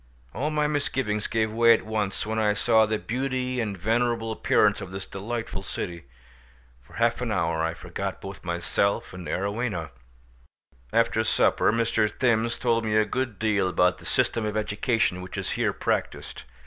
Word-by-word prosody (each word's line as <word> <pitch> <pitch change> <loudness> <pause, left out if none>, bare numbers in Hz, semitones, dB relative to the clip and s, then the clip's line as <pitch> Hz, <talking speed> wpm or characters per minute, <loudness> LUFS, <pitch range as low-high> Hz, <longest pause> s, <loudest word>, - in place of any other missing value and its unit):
All 140 +8 -1
my 150 -1 +1
misgivings 130 -8 -1
gave 110 -1 0
way 115 +1 +6
at - - -5
once 105 -3 -2
when 110 +1 -1
I 105 -1 +3
saw 110 +1 +4
the 110 0 0
beauty 130 +2 -2
and 105 -3 -3
venerable 115 +3 0
appearance 110 - +2
of - - -6
this 95 0 -6
delightful 105 0 -4
city. 85 -4 -5 0.8
For - - -20
half 115 +1 +1
an 120 -3 -1
hour 85 -4 0
I 80 0 -1
forgot - - -5
both 95 0 -9
myself 85 +4 -1
and 90 -1 -8
Arowhena. 100 -4 -2 1.0
After - - +2
supper - - +3
Mr. 115 -1 +1
Thims 115 0 +1
told 115 -2 +1
me 110 -1 +1
a 110 - +4
good 120 -1 -2
deal 105 -4 +1
about 90 0 +2
the - - -14
system 115 - +1
of 105 0 -2
education 105 -2 0
which 90 - -8
is - - -3
here - - +1
practised. - - -3
110 Hz, 170 wpm, -26 LUFS, 95-115 Hz, 1.0 s, way